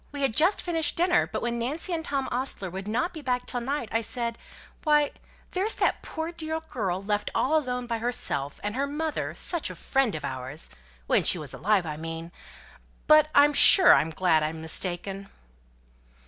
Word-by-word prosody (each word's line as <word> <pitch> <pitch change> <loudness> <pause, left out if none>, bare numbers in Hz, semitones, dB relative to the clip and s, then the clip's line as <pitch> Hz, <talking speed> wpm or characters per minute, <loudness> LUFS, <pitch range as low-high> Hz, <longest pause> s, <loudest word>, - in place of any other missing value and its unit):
We 285 -1 -5
had 250 -5 0
just 350 - +2
finished 330 -3 0
dinner, 355 +1 +2
but - - -4
when 235 0 -2
Nancy 295 +9 -3
said 325 -1 -3
Tom 275 -3 -2
Ostler 245 -7 -1
would 190 +2 -7
not 250 +10 -1
be 315 - -8
back 250 -2 -2
till 245 - -3
night, 270 0 -3
I 225 - +1
said, 235 0 -4 0.4
'Why, 300 -2 +3 0.4
there's 390 +4 -1
that - - 0
poor 320 +1 -5
dear 320 -1 -4
girl 200 - -4
left 210 0 -2
all 300 +5 +1
alone 250 -5 -1
by 230 -1 -3
herself, 185 - -2
and 205 0 -3
her 280 +2 -1
mother 305 +2 -3
such 345 -3 -2
a - - -8
friend 270 - 0
of 150 - -5
ours,' 130 - -6 0.3
when - - +2
she - - +6
was - - -8
alive, 195 +1 +1
I 150 -2 -5
mean. 165 +1 -7 0.7
But 305 0 +5
I'm 290 +1 +6
sure 370 +5 +9
I'm 155 - +2
glad 160 -1 +1
I'm 155 +1 -3
mistaken." 185 +4 -3
245 Hz, 190 wpm, -26 LUFS, 190-305 Hz, 0.7 s, sure